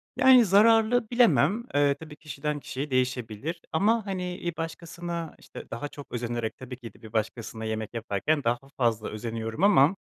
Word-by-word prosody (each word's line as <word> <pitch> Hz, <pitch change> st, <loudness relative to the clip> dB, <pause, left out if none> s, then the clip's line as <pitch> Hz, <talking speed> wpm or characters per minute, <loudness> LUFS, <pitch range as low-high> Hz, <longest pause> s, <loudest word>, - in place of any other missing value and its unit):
Yani, 255 Hz, -3 st, +7 dB
zararlı 225 Hz, +3 st, +4 dB
bilemem, 235 Hz, -2 st, +4 dB
eee, 145 Hz, -1 st, +4 dB
tabii 155 Hz, -2 st, -10 dB
kişiden 150 Hz, -1 st, -4 dB
kişiye 140 Hz, +1 st, -5 dB
değişebilir 130 Hz, +4 st, -1 dB
ama, 215 Hz, +6 st, +2 dB
hani, 180 Hz, -2 st, -3 dB
bir 175 Hz, -1 st, -2 dB
başkasına 170 Hz, 0 st, -5 dB
işte -, -, -11 dB
daha 115 Hz, +6 st, -4 dB
çok 145 Hz, -1 st, -12 dB
özenerek 120 Hz, -1 st, -3 dB
tabii 130 Hz, -1 st, -8 dB
ki 120 Hz, -2 st, -10 dB
de -, -, -21 dB
bir 110 Hz, -1 st, -12 dB
başkasına 110 Hz, 0 st, -3 dB
yemek 110 Hz, 0 st, -3 dB
yaparken 115 Hz, +7 st, -1 dB
daha 120 Hz, +1 st, +2 dB, 0.2 s
fazla 115 Hz, -4 st, +1 dB
özeniyorum 115 Hz, -, -4 dB
ama, 185 Hz, -4 st, +6 dB
145 Hz, 160 wpm, -27 LUFS, 115-180 Hz, 0.2 s, Yani